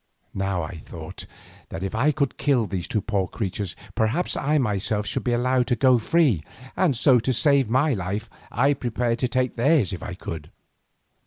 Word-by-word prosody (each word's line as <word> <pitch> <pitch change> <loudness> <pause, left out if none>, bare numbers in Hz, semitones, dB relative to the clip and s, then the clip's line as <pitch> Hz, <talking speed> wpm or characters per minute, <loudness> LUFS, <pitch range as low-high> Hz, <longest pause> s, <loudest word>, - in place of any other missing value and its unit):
Now 95 -3 -1
I 80 +2 -6
thought 80 +2 -9 0.4
that 85 - -6
if 95 - -3
I 130 +8 +3
could 140 -2 -2
kill 135 -5 +2
these 95 -2 -4
two 110 - -1
poor 100 -2 -1
creatures, 95 -2 -4 0.2
perhaps 115 +11 0
I 150 +2 +1
myself 105 -4 0
should - - -2
be 125 - 0
allowed 125 +1 +1
to 125 - +2
go 130 -1 +4
free, 130 - +2 0.3
and 165 -10 +2
so 130 0 +5
to 120 +3 -1
save 135 0 +3
my 135 +5 +3
life 100 +2 -3 0.2
I 135 +6 +3
prepared 120 -2 -1
to 125 - +1
take 130 0 0
theirs 135 - +3
if 90 - -6
I 90 - -6
could. 80 -4 -7
115 Hz, 185 wpm, -24 LUFS, 95-130 Hz, 0.4 s, so